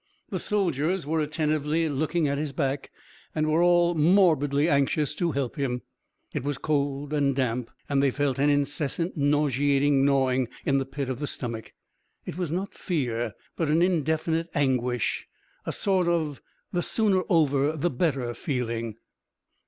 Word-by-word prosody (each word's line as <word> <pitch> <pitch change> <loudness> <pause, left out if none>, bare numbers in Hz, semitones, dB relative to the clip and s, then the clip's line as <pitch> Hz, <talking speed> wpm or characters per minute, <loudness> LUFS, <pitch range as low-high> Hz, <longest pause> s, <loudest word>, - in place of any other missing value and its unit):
The - - -1
soldiers 180 -4 0
were 160 +2 0
attentively 155 +1 0
looking 155 +2 0
at 140 0 -1
his 150 -2 -3
back 135 -1 -2 0.5
and 155 -1 +1
were 160 +2 +3
all 175 0 +4
morbidly 155 -4 +3
anxious 145 0 +1
to 170 0 -1
help 135 -3 -2
him. 125 -3 -2 0.5
It - - -2
was 145 0 -2
cold 145 -1 -1
and 140 -2 +2
damp, 125 -2 -1 0.2
and 140 -1 +2
they 140 - +4
felt 135 -1 -1
an 145 +1 +4
incessant, 145 +4 0
nauseating 145 -1 +2
gnawing 130 -2 +2 0.2
in 140 -1 +3
the 135 - -3
pit 135 0 -4
of 130 -1 -3
the 145 - -2
stomach. 115 -5 -5 0.5
It - - -6
was 175 -4 -3
not 190 +4 -3
fear 120 -9 -2 0.2
but 160 -3 -1
an 160 +3 +4
indefinite 160 -1 0
anguish, 125 -4 0 0.4
a - - 0
sort 190 -3 +1
of 160 -5 0 0.3
the 175 - +1
sooner 200 -1 +2
over 150 -3 +2
the 175 +4 0
better 130 -4 0
feeling. 115 -4 -3
145 Hz, 155 wpm, -26 LUFS, 135-160 Hz, 0.5 s, all